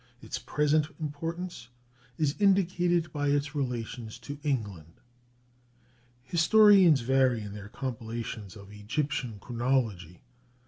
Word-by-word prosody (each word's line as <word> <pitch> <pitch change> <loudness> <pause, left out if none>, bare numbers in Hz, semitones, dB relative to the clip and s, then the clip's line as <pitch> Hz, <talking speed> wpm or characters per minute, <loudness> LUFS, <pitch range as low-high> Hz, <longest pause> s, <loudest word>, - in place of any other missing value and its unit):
Its - - -6
present 150 0 +1
importance 165 -1 -5 0.5
is 150 -2 +1
indicated 180 -4 +2
by 145 -1 -1
its 145 +1 0
relations 120 -4 -4
to 145 0 -8
England. 105 - -3 1.3
Historians 175 - +6
vary 130 -2 +2
in 100 -1 -7
their 105 -1 -9
compilations 115 -5 -5
of 100 -1 -12
Egyptian 115 +2 -3
chronology. 115 -8 -2
135 Hz, 100 wpm, -29 LUFS, 110-155 Hz, 1.3 s, Historians